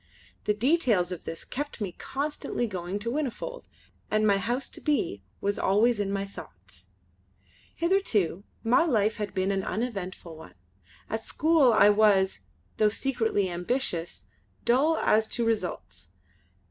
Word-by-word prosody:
The 210 - +2
details 230 - +2
of 180 - -6
this 165 - -6
kept 290 0 -5
me 200 -4 -3
constantly 275 - -3
going 185 -2 -4
to 225 +3 -3
Whinnyfold, 305 - -4 0.4
and 215 0 +2
my 200 -2 +4
house 245 +5 -2
to - - -10
be 280 - 0 0.2
was 200 0 -1
always 215 +4 +3
in 200 -1 -1
my 200 0 -1
thoughts. 95 - -13 0.9
Hitherto 305 - +1 0.2
my 240 +6 +4
life 220 -9 +1
had 210 -1 -4
been 190 +1 +1
an 195 -1 -1
uneventful 195 -7 -4
one. 160 +1 -13 0.5
At 225 - -3
school 310 -1 +3
I 210 -2 +6
was, 205 - +4 0.4
though 215 - +4
secretly 225 -4 0
ambitious, 175 -1 -2 0.4
dull 290 +7 +3
as 220 0 +3
to 235 - -1
results. 180 - -3
215 Hz, 140 wpm, -27 LUFS, 190-250 Hz, 0.9 s, I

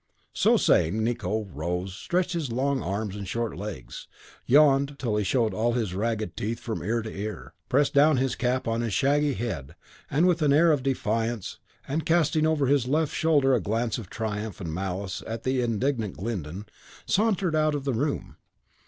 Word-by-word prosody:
So - - +4
saying, 105 +8 +3
Nicot 110 -2 -2
rose, 90 +5 -3
stretched 180 - -1
his 160 -7 -2
long 135 +3 0
arms 100 +2 -3
and 100 -2 -6
short 115 +3 -2
legs, 95 -8 -7 0.4
yawned 140 0 +4
till 115 -6 -1
he 105 - +1
showed 115 0 +1
all 115 +4 +1
his 110 -7 -1
ragged 110 +2 -2
teeth 115 +3 -3
from 115 - -4
ear 115 +1 -1
to 110 - -7
ear, 95 - -6 0.2
pressed 140 +2 +2
down 145 0 +5
his 130 0 +1
cap 125 0 -1
on 115 +1 0
his 115 -4 -1
shaggy 145 0 +2
head 85 - -4 0.4
with 170 +3 +3
an 145 -2 +4
air 165 +3 +5
of 145 -3 +2
defiance, 115 -4 -2 0.3
and 155 +4 -1
casting 160 -2 +2
over 155 -3 +2
his 135 -2 +2
left 155 +2 +1
shoulder 145 -5 +3
a 120 - +2
glance 115 +3 -1
of 100 -6 -9
triumph 110 -1 -4
and 85 -5 -5
malice 95 +1 -3
at 115 +1 -5
the 130 0 +1
indignant 115 -2 -1
Glyndon, 95 -2 -4 0.4
sauntered 195 -5 +1
out 155 -1 +2
of 145 - -3
the 135 -2 -1
room. 110 - -2
120 Hz, 180 wpm, -26 LUFS, 105-140 Hz, 0.4 s, down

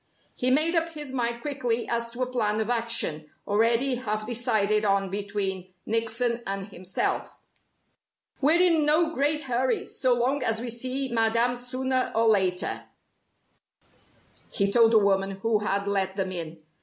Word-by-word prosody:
He 250 - +1
made 310 +6 +4
up 330 -1 +1
his 295 -3 -6
mind 235 -2 -2
quickly 250 -5 -2
as 235 0 -1
to 240 +2 -3
a - - 0
plan 220 -4 -1
of 220 +2 -1
action, 230 -10 0 0.2
already 230 +5 +2
half 215 -3 -3
decided 215 -3 +1
on 195 -2 +1
between 195 -2 -3
Nickson 230 +1 0
and 195 0 -3
himself. 185 -1 -3 1.0
"We're 310 +5 +4
in 340 -4 +4
no 315 +2 +2
great 300 +2 +1
hurry, 255 0 -1
so 255 -2 +1
long 260 +4 0
as 225 -2 +1
we 240 0 -4
see 255 +3 -1
Madame 230 +2 +2
sooner 255 +1 -2
or 225 +1 +3
later," 190 -4 +1 1.6
he 200 0 0
told 230 +1 +5
the 225 - +5
woman 195 -1 +1
who 225 -2 +2
had 200 -1 -1
let 195 -1 -1
them 190 -2 -2
in. 165 -3 -6
230 Hz, 155 wpm, -26 LUFS, 200-255 Hz, 1.6 s, told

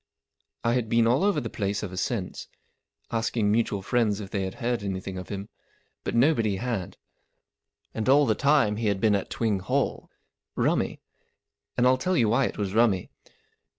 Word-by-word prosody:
I 115 - +2
had 120 -3 0
been 115 0 +4
all 125 +8 +3
over 200 -6 +2
the 120 - -4
place 100 0 -2
ever 95 -3 -5
since, 100 0 -3 0.6
asking 115 -2 0
mutual 105 -3 0
friends 110 -2 +1
if 100 -2 -8
they 100 -2 -1
had 95 - -5
heard 120 -1 -1
anything 95 -1 -4
of 95 -1 -7
him, 100 0 -5 0.6
but - - -3
nobody 115 -5 +3
had. 110 -3 -3 1.0
And 110 +2 -2
all 145 +2 +6
the 110 - +3
time 135 -4 +3
he 110 -1 -1
had 100 -2 +1
been 110 0 +3
at 100 - -1
Twing 110 -4 0
Hall. - - -1 0.5
Rummy. - - 0 0.8
And 125 - +3
I'll 130 +1 +4
tell 180 +6 0
you 115 -3 +3
why 125 +4 +3
it - - -4
was 100 -2 -2
rummy. 110 -5 +2
110 Hz, 180 wpm, -26 LUFS, 100-120 Hz, 1.0 s, all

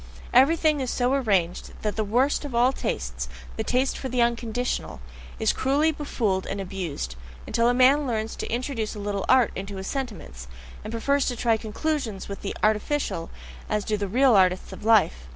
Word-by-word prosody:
Everything 305 +3 +4
is 260 -2 -2
so 250 +2 +1
arranged 195 -10 0
that 210 -1 -1
the 220 - 0
worst 250 +9 +1
of 280 -5 -5
all 245 +3 +4
tastes, 65 - -3 0.3
THE - - -2
TASTE 260 +2 +1
FOR 265 - -4
THE 250 0 -1
UNCONDITIONAL, 235 +1 -1 0.4
is 220 -1 +2
cruelly 285 +4 +2
befooled 225 -11 -1
and 200 - -4
abused, 175 - -4 0.3
until 230 +1 +2
a - - +3
man 270 +3 +5
learns 220 -2 -2
to - - -5
introduce 235 -3 -2
a - - -6
little 200 -1 -2
art 255 -3 +5
into 195 +1 -5
his 190 0 -6
sentiments, 205 - -5 0.4
and 215 - -6
prefers 280 +5 +1
to 245 - -1
try 230 -1 +2
conclusions 220 -1 -3
with 200 - -7
the 200 - -4
artificial, 215 - 0 0.4
as 210 -1 -1
do 215 - 0
the 205 -1 -2
real 250 +4 +4
artists 185 -1 +2
of - - -10
life. 210 - +3
225 Hz, 185 wpm, -25 LUFS, 200-260 Hz, 0.4 s, man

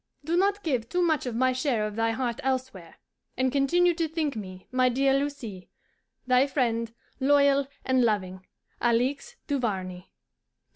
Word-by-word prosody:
Do 330 +3 0
not 400 +3 +1
give 250 -8 -1
too 360 +4 +1
much 315 -6 +1
of 240 - -3
my 255 +2 +2
share 250 -5 0
of 210 -1 -5
thy 225 0 +1
heart 235 0 -2
elsewhere, 255 -10 -3 0.4
and 260 0 +1
continue 345 +6 +3
to 330 -1 -1
think 310 -3 -2
me, 185 -3 -8
my 255 0 +3
dear 270 +2 +2
Lucie, 270 -9 -3 0.6
thy 255 +2 +4
friend, 230 -4 0 0.3
loyal 280 0 +4 0.2
and 260 -1 +3
loving, 190 -4 -1 0.4
ALIXE 255 - 0
DUVARNEY. 190 -10 -3
255 Hz, 150 wpm, -27 LUFS, 225-285 Hz, 0.6 s, thy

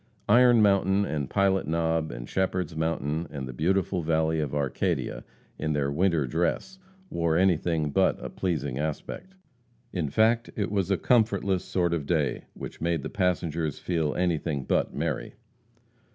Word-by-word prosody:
Iron 120 -2 +6
Mountain, 100 0 +3
and 75 -7 -3
Pilot 95 -1 +2
Knob, 80 -1 0
and - - -7
Shepherd's 90 -3 -1
Mountain, 80 0 -1
and 70 -3 -6
the 65 - -7
beautiful 90 +5 0
valley 80 0 +1
of 75 -2 -2
Arcadia, 70 -3 -1 0.4
in 75 0 -1
their 70 -1 0
winter 85 -1 +2
dress, 85 - -1 0.3
wore 85 -1 +1
anything 85 -4 +2
but - - +2
a - - -5
pleasing 75 -8 -2
aspect. 80 - -5 0.6
In 85 -6 -1
fact, 115 - +2
it 105 -2 -2
was 100 -2 0
a 100 - +2
comfortless 100 -6 +2
sort 85 -2 0
of 75 -4 -2
day, 75 -6 0
which - - -8
made 85 -3 0
the - - -5
passengers 85 -4 -1
feel 80 -4 -1
anything 80 -5 0
but - - 0
merry. - - -3
85 Hz, 150 wpm, -27 LUFS, 75-95 Hz, 0.6 s, Iron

